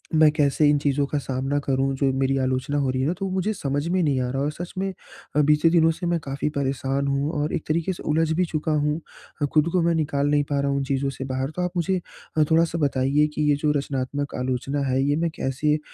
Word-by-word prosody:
मैं 155 -1 +7
कैसे 150 -1 +3
इन 145 - +4
चीज़ों 145 0 +1
का 150 - -2
सामना 135 +1 -2
करूँ 135 0 +1
जो 135 0 +2
मेरी 135 0 +1
आलोचना 130 +3 -1
हो 140 -2 +1
रही 130 0 -1
है 135 - +1
ना 170 - +1
तो 195 - -2
वो 190 - -3
मुझे 190 +3 0
समझ 145 -2 -2
में 185 0 +2
नहीं 140 -4 +1
आ 125 - -1
रहा 135 - -2
और 150 - 0
सच 175 +3 -7
में 190 0 -1 0.4
अ, 150 - +5
बीते 150 +2 +4
दिनों 165 -1 +4
से 175 +2 -5
मैं 170 -1 +1
काफ़ी 140 +2 -2
परेशान 135 0 -1
हूँ 140 +2 0
और 150 - -2
एक 165 - -4
तरीके 170 +4 0
से - - -10
उलझ 160 +1 +2
भी 180 - +3
चुका 155 -1 -2
हूँ 150 +1 +1 0.4
अ, 145 - +3
ख़ुद 155 +2 +4
को 180 - +3
मैं 170 0 +3
निकाल 145 -2 0
नहीं 145 0 +3
पा 140 -1 +1
रहा 140 - 0
हूँ 140 - 0
उन 140 - 0
चीज़ों 135 0 0
से 135 - -6
बाहर। 130 +2 -2
तो - - 0
आप 180 - -1
मुझे 180 +2 +1 0.4
अ, 155 - +6
थोड़ा-सा 165 0 +3
बताइए 140 +1 +2
कि - - -1
ये 145 - +4
जो 150 - +3
रचनात्मक 140 0 -3
आलोचना 130 +3 -2
है। 130 +1 +1
ये 145 +1 +2
मैं 165 0 +1
कैसे 140 +3 0
अ, 155 - -3
145 Hz, 265 wpm, -24 LUFS, 135-160 Hz, 0.4 s, मैं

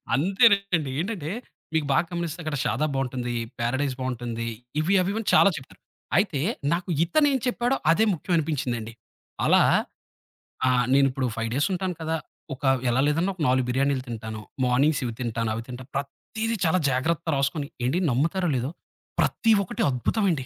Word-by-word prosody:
అంతేనండి. 195 - +3
ఏంటంటే 175 -4 -3 0.4
మీకు 160 -2 +1
బాగా 135 +5 +3
గమనిస్తే 170 -1 -3
అక్కడ 155 -1 -2
షాదాబ్ 145 +5 0
బావుంటుంది. 125 -2 -2 0.2
పారడైస్ 130 +3 0
బావుంటుంది. 120 -2 -3 0.3
ఇవి 165 +5 +1
అవివన్నీ 200 +4 -2
చాలా 200 - +7
చెప్పారు. 135 - -12 0.4
అయితే 190 -7 +1 0.3
నాకు 175 +2 -3
ఇతనేం 285 - +3
చెప్పాడో 245 +1 +1 0.2
అదే 215 +7 +4
ముఖ్యం 175 +2 -3
అనిపించిందండి. 125 -7 -2 0.5
అలా - - +5 1.1
ఆ! - - +4 0.2
నేను 135 0 +5
ఇప్పుడు 130 0 -1
5 115 0 -2
డేస్ 145 +3 +2
ఉంటాను 185 -1 -2
కదా! 160 0 -1 0.4
ఒక 135 - -12 0.3
ఎలా 125 +2 +2
లేదనా 165 +6 +1
ఒక 175 - -9
4 130 0 +2
బిర్యానీలు 135 +1 +1
తింటాను. 110 -2 -6 0.2
మార్నింగ్స్ 135 +5 +2
ఇవి 120 - -3
తింటాను. 115 -2 -1
అవి 115 - -4
తింటా. 125 0 -7
ప్రతీదీ 220 +11 -3
చాలా 165 +3 +3
జాగ్రత్త 160 +6 0
రాసుకొని 140 +2 -1 0.2
ఏండి 140 +8 +1
నమ్ముతారో 165 +8 +1
లేదో? 125 +3 -1 0.5
ప్రతి 225 - +2
ఒక్కటి 185 - -5
అద్భుతమ 140 - 0
అండి 135 -6 -2
145 Hz, 155 wpm, -25 LUFS, 125-180 Hz, 1.1 s, చాలా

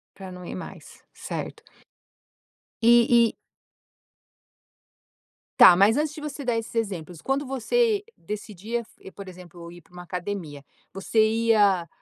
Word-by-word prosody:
Para 190 -1 -10
não 180 -1 -10
ir - - -7
mais, 185 - -11
certo. - - -7 1.2
E 235 0 +5
e - - -16 2.2
Tá 175 - +9
mas 200 +6 +4
antes 300 0 -1
de 310 - -9
você 295 -1 -6
dar 240 -2 0
esses 225 +1 -6
exemplos, 180 -7 -4
quando 270 +1 -1
você 415 - 0
decidia 210 +2 -5
f 215 -3 -15
por 200 0 -11
exemplo, 175 -2 -12
ir 175 0 -13
para 180 - -29
uma 180 0 -10
academia, 180 -6 -6 0.3
você 195 +3 -2
ia, 210 -6 +2
205 Hz, 135 wpm, -25 LUFS, 180-235 Hz, 2.2 s, Tá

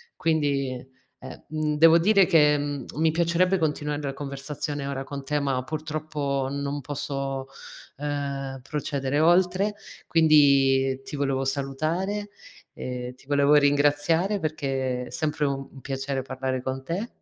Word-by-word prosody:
Quindi 140 -5 -1 0.2
e 130 - -9
mhmm, 155 -1 -1
devo 165 +1 +7
dire 195 +1 +5
che, 150 -2 +5
mhmm, 145 -3 -3
mi 160 +1 +2
piacerebbe 170 +3 +2
continuare 150 -1 -1
la 140 -1 -3
conversazione 140 0 -5
ora 135 -1 -3
con 140 0 -7
te, 150 +2 0
ma 135 -2 0
purtroppo, 150 -2 -3
non 140 0 -3
posso, 135 -1 -4 0.5
uhm, 140 -2 -3
procedere 145 -1 -1
oltre. 185 +5 +3 0.3
Quindi 140 -4 +4
ti - - -7
volevo 135 -1 0
salutare, 155 +10 -2 0.4
ehm, 125 0 -5
ti 135 +2 -22
volevo 145 0 +3
ringraziare, 145 +7 +3
perché 135 -5 -2
sempre 150 -2 -1
u 135 -1 -3
un 135 - -12
piacere 135 0 -3
parlare 130 -1 -3
con 130 0 -4
te. 185 - -3
145 Hz, 130 wpm, -25 LUFS, 135-155 Hz, 0.5 s, devo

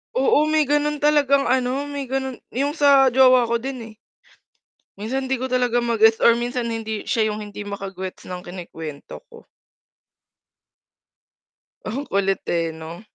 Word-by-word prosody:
Oo, 270 +3 +3
may 310 -1 +2
ganun 295 +1 +1
talagang 285 -2 +3
ano, 260 +3 0
may 285 -1 -4
ganun 265 0 -3 0.2
'yung 280 +4 -1
sa 280 -3 +5
jowa 255 -1 +5
ko 235 - 0
din, 260 +2 -4
eh. - - -16 1.1
Minsan 260 +5 -3
'di 265 - 0
ko 260 - -2
talaga 250 -2 +1
ma-gets 225 -2 +3
or 235 - +5
minsan 240 0 -2
hindi 220 -2 -4
siya 220 -2 +1
yung 210 - -5
hindi 210 -1 -7
maka-gets 195 -2 -7
ng 180 -1 -7
kinukwento 165 - -9
ko. 465 - -15 2.4
Ang 265 +7 -4
kulit, 195 -3 -1
eh, 165 -1 -1
'no. 160 +2 -9
245 Hz, 145 wpm, -22 LUFS, 210-270 Hz, 2.4 s, sa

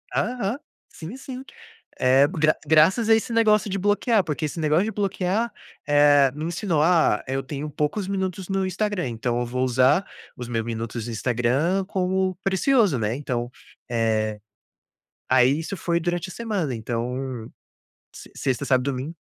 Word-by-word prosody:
Aham, 240 -2 -1 0.3
sim, 175 +10 -9
sim, 260 -1 -8 0.6
eh, 130 +2 +5
gra 155 -3 +2
graças 160 +9 +4
a 225 - +7
esse 225 +1 -1
negócio 215 -2 +3
de 195 - -2
bloquear, 205 +2 +2
porque 155 -2 -3
esse 155 +2 -3
negócio 155 +4 +2
de 220 - -2
bloquear, 205 +2 -1 0.4
eh, 145 -1 +5
me 150 +1 -5
ensinou, 170 -2 0
ah, 160 -10 +3
eu 135 +1 -2
tenho 140 +2 -5
poucos 150 +7 -2
minutos 190 -2 -3
no 195 -1 0
Instagram, 195 -4 -2
então 120 +1 -2
eu 120 - -2
vou 125 +2 -1
usar 130 +8 +3 0.3
os 125 - -6
meus 115 -2 -2
minutos 115 0 -4
no 120 - -5
Instagram 125 - 0
como 190 -1 0
precioso, 195 - +3
né. 110 0 -1
Então 125 -4 -3 0.4
eh. 110 -2 0 0.9
Aí 130 +2 +4
isso 165 +5 -4
foi 170 -1 -1
durante 175 +1 -2
a - - -8
semana, 200 - -2
então 120 +1 -4 0.6
se - - -13
sexta, 135 +1 -1
sábado, 130 -2 +2
domingo. 135 +5 -5
155 Hz, 160 wpm, -24 LUFS, 125-195 Hz, 0.9 s, a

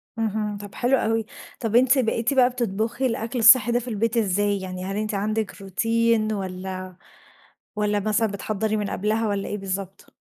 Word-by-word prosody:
اهم، 215 -2 -2
طب 205 -1 -10
حلو 255 +2 +2
اوي، 225 -2 0 0.3
طب 225 -2 -2
أنتِ 255 +2 +5
بقيتِ 235 +2 0
بقى 255 -2 +5
بتطبخي 230 +1 -2
الأكل 230 +1 -2
الصحي 235 0 +7
ده 240 - +2
في 245 - -9
البيت 230 0 -1
إزاي؟ 205 -1 +1
يعني 185 0 -6
هل 195 - -4
أنتِ 215 0 -2
عندِك 215 0 -2
روتين 225 +2 +1
والّا 185 -1 -5 0.8
والّا 210 -1 +1
مثلًا 215 +2 +1
بتحَضّري 215 +2 -2
من 205 -2 -2
قبلها 215 +2 0
والّا 200 -1 -2
إيه 210 - -3
بالضبط؟ 195 0 -5
215 Hz, 170 wpm, -24 LUFS, 200-230 Hz, 0.8 s, الصحي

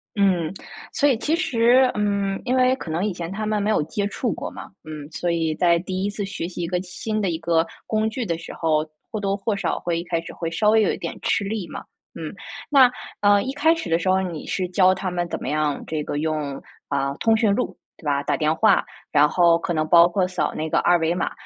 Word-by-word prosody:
嗯。 185 -4 +2 0.4
所 290 - +3
以 265 -5 +3
其 300 +7 0
实， 255 -3 +4
嗯， 200 -2 0
因 255 +1 +1
为 255 0 +4
可 190 - -8
能 170 +6 -1
以 210 - -1
前 170 0 -6
他 215 +2 -3
们 210 -1 0
没 205 - 0
有 215 - +3
接 200 +6 -2
触 220 +2 -2
过 - - -5
嘛， - - -9 0.2
嗯， 155 -1 -8
所 175 +1 -1
以 165 -2 0
在 170 -1 +3
第 185 +2 -3
一 205 - 0
次 205 0 -4
学 190 -4 -4
习 175 -1 -6
一 170 - -2
个 180 +1 -1
新 215 +4 -3
的 195 - 0
一 165 - -1
个 165 0 +2 0.2
工 220 0 0
具 240 +2 -4
的 170 -4 -1
时 165 - -9
候， 155 -2 +1 0.3
或 215 - -3
多 195 -1 0
或 205 +1 -1
少 200 - -1
会 170 -1 -1
一 - - -4
开 170 -1 -1
始 - - -9
会 165 -1 -4
稍 210 +5 +2
微 220 0 +5
有 200 - +2
一 - - -3
点 170 - -5
吃 - - +1
力 200 -3 -3
嘛， - - -6 0.4
嗯。 160 +2 -5 0.4
那， 265 -4 +6 0.3
呃， 205 0 +5
一 265 - -3
开 320 +3 +3
始 330 - -5
的 165 +1 +2
时 185 - -1
候， 190 0 +3
你 170 -5 -5
是 185 -2 -1
教 185 0 +4
他 190 -1 -3
们 175 -1 -2
怎 - - -3
么 - - -5
样 150 -1 0
这 155 -1 -3
个 145 - -3
用， 150 -2 -2 0.3
啊， 140 -1 0
通 225 -1 +3
讯 220 -3 +3
录， 250 - -2 0.2
对 160 - -17
吧， 140 -1 +1
打 - - 0
电 155 0 +2
话？ 220 - +4 0.3
然 150 0 +5
后 170 -1 +4
可 175 - -2
能 155 -1 0
包 170 +1 +7
括 180 +1 0
扫 185 - -2
那 155 +1 -3
个 - - +2
二 175 - +4
维 165 0 +1
码。 180 - -1
180 Hz, 275 characters per minute, -23 LUFS, 165-210 Hz, 0.4 s, 包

